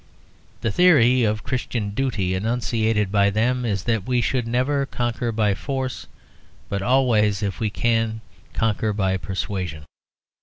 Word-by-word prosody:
The 115 - 0
theory 130 - +5
of 105 -1 0
Christian 125 -5 -3
duty 105 -6 -1
enunciated 110 0 0
by 100 -1 +4
them 120 +5 0
is 100 -5 -1
that 115 -5 -1
we 125 -1 +2
should 120 -1 0
never 135 +4 0
conquer 120 -1 -2
by 105 -2 +1
force, 130 +4 -4 0.6
but 100 -1 -2
always, 110 -4 +2
if 100 -2 -3
we 110 -2 0
can, 115 +1 0 0.3
conquer 110 -1 0
by 95 -2 0
persuasion. 90 -4 -4
110 Hz, 140 wpm, -23 LUFS, 100-125 Hz, 0.6 s, theory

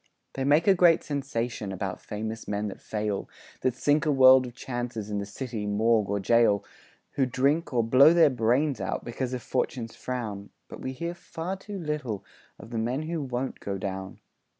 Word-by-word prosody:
They 135 - -3
make 145 +4 +4
a 195 - +6
great 175 -3 +5
sensation 125 -7 -3
About 95 0 -4
famous 110 +1 -5
men 105 0 -2
that - - -10
fail, 105 -2 -3 0.3
That 130 -2 +1
sink 145 +4 +2
a - - +4
world 130 -1 +7
of 120 - -11
chances 120 -5 -4
In 105 - -1
the 100 - -4
city 110 -1 -5
morgue 110 0 +2
or 100 0 0
gaol, 105 -1 +3 0.5
Who 135 -2 +1
drink, 140 +7 +1
or 120 -3 +2
blow 130 +7 +7
their 165 -4 +5
brains 125 +1 +1
out, - - -3
Because 125 +1 -3
of 125 - -6
"Fortune's 120 -2 -2
frown". 110 -6 -5 0.2
But - - -10
we 130 - -4
hear 170 +6 -4
far 175 +1 -5
too 200 +1 -8
little 150 - -3 0.3
Of 110 +4 -12
the 115 - -2
men 125 +6 -1
who 165 0 -3
won't 130 -1 -3
go 100 -1 -4
down. 95 0 -5
125 Hz, 190 wpm, -27 LUFS, 105-140 Hz, 0.5 s, world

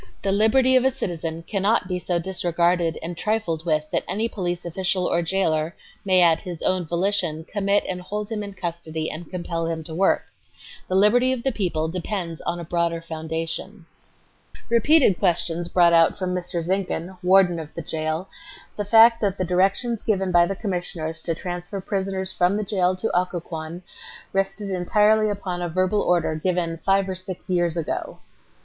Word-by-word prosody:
The 195 - +1
liberty 250 +6 +4
of 255 - +5
a 265 - +4
citizen 165 -8 -4
cannot 200 +1 +1
be 180 -1 -2
so 175 0 -1
disregarded 175 -1 0
and 170 +1 -4
trifled 175 -5 -1
with 155 -1 +1
that - - 0
any 220 +3 -1
police 175 -5 -4
official 180 +1 -1
or 170 - +1
jailer 165 -2 0 0.3
may 185 -2 +4
at 165 -2 +5
his 175 -3 -7
own 185 -2 +1
volition, 175 -2 0
commit 200 +1 +1
and 180 -1 -3
hold 210 +4 -5
him 215 -1 -2
in 200 -1 -7
custody 165 -3 -4
and 160 0 -8
compel 170 -2 -3
him 165 -1 -3
to 160 - -8
work. 190 +4 +2 0.6
The 185 - -1
liberty 240 +6 +4
of 245 -2 -5
the 270 - +1
people 175 -8 -1
depends 175 -1 -4
upon 175 - -3
a - - -5
broader 170 0 0
foundation." 165 +3 -5 0.8
Repeated 235 - +4
questions 170 -2 +1
brought 175 -1 +4
out 165 -1 +5
from 185 -2 -2
Mr. 180 -1 -2
Zinkhan, 185 0 -2
Warden 180 -2 +4
of 155 -1 -8
the 170 - -5
Jail, 155 +3 -3 0.5
the 205 - -1
fact 225 +3 +6
that 200 -2 0
the 185 - -1
directions 195 +6 +1
given 195 -4 0
by 175 0 +5
the 195 - -3
Commissioners 175 -5 -4
to 165 - -2
transfer 180 +3 -5
prisoners 190 -1 -2
from 180 +3 +2
the 215 - -1
jail 185 -2 +1
to 205 +2 -2
Occoquan 175 -1 -3 0.5
rested 195 +1 -1
entirely 210 +4 +3
upon 190 -3 -3
a 175 - -2
verbal 185 +4 +1
order 175 -3 +1
given 170 +1 -1
"five 195 +3 +1
or 190 - -2
six 185 0 -6
years 175 -2 +1
ago." 165 - -3
180 Hz, 175 wpm, -23 LUFS, 170-195 Hz, 0.8 s, fact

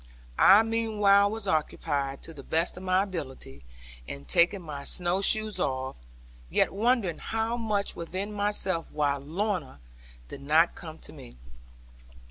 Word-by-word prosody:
I 200 +3 +8
meanwhile 210 -3 +3
was 220 -1 -5
occupied, 145 -4 -1
to 165 - -7
the 145 - -10
best 165 +5 0
of 180 - -9
my 185 +1 +2
ability, 130 - -7 0.4
in 70 0 -8
taking 175 - +3
my 145 -3 -7
snow 180 +4 0
shoes 215 +1 +3
off, 130 - -2 0.5
yet - - +2
wondering 215 -5 0 0.4
much 210 -3 -1
within 185 +5 -5
myself 200 -4 -1
why 145 -2 0
Lorna 165 - -3 0.5
did 140 - -9
not 155 +4 +3
come 160 -2 -9
to - - -12
me. - - -13
180 Hz, 135 wpm, -27 LUFS, 145-205 Hz, 0.5 s, I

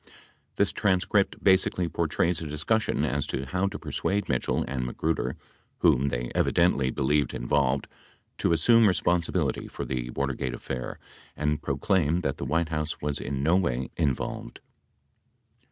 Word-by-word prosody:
This - - +2
transcript 100 0 +1
basically 95 -2 +3
portrays 85 +1 0
a 80 - -4
discussion 105 +10 0
as 70 -1 -1
to 65 - -3
how 90 +8 0
to 100 +1 -4
persuade 95 +6 -2
Mitchell 65 -3 0
and 65 -2 -2
Ma 60 - -4
gruder, 80 -4 -1 0.5
whom 65 +3 +4
they - - -2
evidently 80 -7 +2
believed 70 +1 +1
involved, 70 +2 +1 0.5
to - - +2
assume 115 +7 +5
respon 90 -3 +2
sibility 80 -6 -1
for - - -5
the 60 -2 -3
Watergate 70 0 -2
affair 65 -2 -5 0.4
and 75 0 0
proclaim 80 +4 +1
that - - -2
the - - -4
White 80 +4 0
House 75 0 -2
was 75 -1 -2
in 70 0 -3
no 80 +4 +4
way 65 -9 0
involved. 70 -5 -2
75 Hz, 150 wpm, -27 LUFS, 70-90 Hz, 0.5 s, assume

